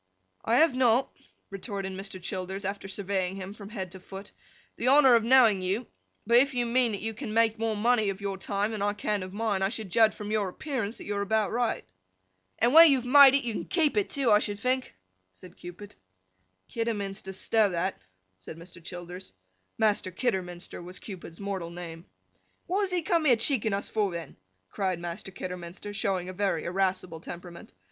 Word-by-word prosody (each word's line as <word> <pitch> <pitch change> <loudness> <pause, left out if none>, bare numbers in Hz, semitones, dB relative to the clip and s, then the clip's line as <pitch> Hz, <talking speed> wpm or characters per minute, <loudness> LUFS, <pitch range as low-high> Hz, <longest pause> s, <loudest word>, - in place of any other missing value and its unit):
'I 230 - +2
have 310 0 +4
not,' 255 0 +2 0.4
retorted 195 -1 -5
Mr. 195 0 -6
Childers, 190 +2 -4
after 195 0 -4
surveying 190 -1 -2
him 195 0 -7
from 205 -2 -11
head 190 -5 -5
to 190 - -10
foot, 195 +2 -10 0.4
'the 240 - -2
honour 270 -1 +7
of 230 -1 +5
knowing 230 -5 +5
you,—but 215 +3 -1
if 270 +1 +3
you 245 -1 +1
mean 235 -1 +2
that 200 - -4
you 225 0 -2
can 215 0 -6
make 225 -1 +3
more 225 -1 0
money 220 -1 +2
of 195 0 -4
your 200 -1 -3
time 205 +2 -1
than 215 -2 -4
I 205 0 +1
can 205 0 -2
of 185 0 -6
mine, 205 -1 -1
I 195 - +2
should 215 -4 -6
judge 220 +2 +4
from 210 0 -6
your 210 -3 0
appearance, 240 -1 -4
that - - -9
you 205 - -3
are - - 0
about 215 +1 +1
right.' 235 -1 -1 0.7
'And 240 +3 +2
when 330 +1 +10
you 275 - +5
have 250 - -5
made 275 +1 +8
it, 280 - +1
you 235 -2 -2
can - - -4
keep 325 -5 +1
it 415 -2 +1
too, 270 -5 +1
I 210 - +7
should 205 -1 -2
think,' 255 - -1 0.4
said 175 - -13
Cupid. 180 +4 -10 0.7
'Kidderminster, 205 -4 -3
stow 210 +2 +2
that!' 180 +2 -2 0.4
said 95 +12 -10
Mr. 170 0 -12
Childers. 180 +2 -8 0.4
(Master 210 -3 +1
Kidderminster 185 -5 -3
was 180 +1 -8
Cupid's 180 -4 -9
mortal 195 -4 -4
name.) 170 -1 -9 0.6
'What 380 +3 0
does 390 -2 0
he 355 -2 0
come 335 -3 +1
here 255 -5 +6
cheeking 225 -2 +1
us 200 - -1
for, 210 -2 0
then?' 170 -4 -7 0.3
cried 185 - -2
Master 175 +3 -6
Kidderminster, 180 +2 -7
showing 195 -4 -1
a 185 - -6
very 190 -4 -1
irascible 185 -2 -1
temperament. 175 +1 -10
205 Hz, 195 wpm, -28 LUFS, 185-235 Hz, 0.7 s, when